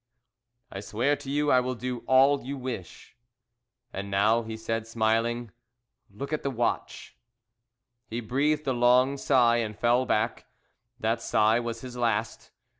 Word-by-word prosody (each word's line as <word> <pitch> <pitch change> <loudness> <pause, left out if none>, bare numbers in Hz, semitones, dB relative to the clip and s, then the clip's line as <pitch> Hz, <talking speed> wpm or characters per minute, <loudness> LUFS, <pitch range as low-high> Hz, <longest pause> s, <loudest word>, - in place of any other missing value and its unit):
"I 95 - -6
swear 120 +8 0
to 140 -1 -9
you 145 +1 +1
I 130 - +6
will 125 0 -2
do 125 +1 -4
all 135 +2 +4
you 140 +3 -5
wish." 125 -9 -7 0.8
"And 100 +1 -5
now," 105 +4 +3
he 110 -1 -7
said, 115 0 -3
smiling, 115 +1 0 0.6
"look 140 +9 -7
at 155 - -1
the 140 - -2
watch!" 120 -2 -3 0.9
He 115 +1 -4
breathed 145 +6 0
a 130 - +1
long 125 +3 +4
sigh, 125 -4 +3
and 110 -3 -3
fell 120 +2 +2
back. 110 +2 -1 0.5
That 115 +1 0
sigh 110 +1 +2
was 115 -1 -5
his 125 -1 -8
last. 115 -2 -1
120 Hz, 150 wpm, -27 LUFS, 110-130 Hz, 0.9 s, I